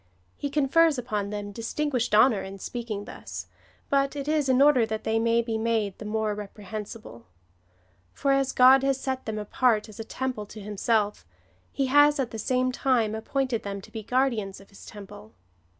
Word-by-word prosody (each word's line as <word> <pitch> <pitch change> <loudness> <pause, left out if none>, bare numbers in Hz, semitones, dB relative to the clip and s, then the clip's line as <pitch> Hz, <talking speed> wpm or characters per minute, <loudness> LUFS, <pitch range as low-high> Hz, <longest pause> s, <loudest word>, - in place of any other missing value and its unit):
He 285 - -4
confers 295 +2 +3
upon 210 -5 -3
them 205 0 -5
distinguished 240 +2 -1
honour 220 -1 +5
in 195 +1 -8
speaking 215 -1 -5
thus, - - -8 0.4
but 275 0 +1
it 280 0 -5
is 300 -3 +1
in 255 0 +4
order 280 -4 +6
that 220 -1 -3
they 220 0 +1
may 230 +1 +2
be 225 -1 -2
made 220 -4 0
the 215 - -8
more 215 0 -1
repre 210 0 -9
hensible; 210 - -8 0.9
for, 275 - 0
as 275 -1 +2
God 260 +1 +7
has 270 -1 +1
set 260 -2 -4
them 220 -1 -3
apart 215 +1 +1
as 215 +1 -13
a - - -3
temple 250 -2 -4
to 215 - -10
himself, 210 +1 -1 0.5
he 275 - 0
has 290 +2 +5
at 255 -3 -1
the 225 - -6
same 255 +2 +1
time 245 -4 +1
appointed 245 +2 -1
them 200 0 -5
to 195 - -14
be 220 - -5
guardians 225 -4 0
of 195 - -17
his 200 - -14
temple. 195 - -11
230 Hz, 185 wpm, -26 LUFS, 210-265 Hz, 0.9 s, God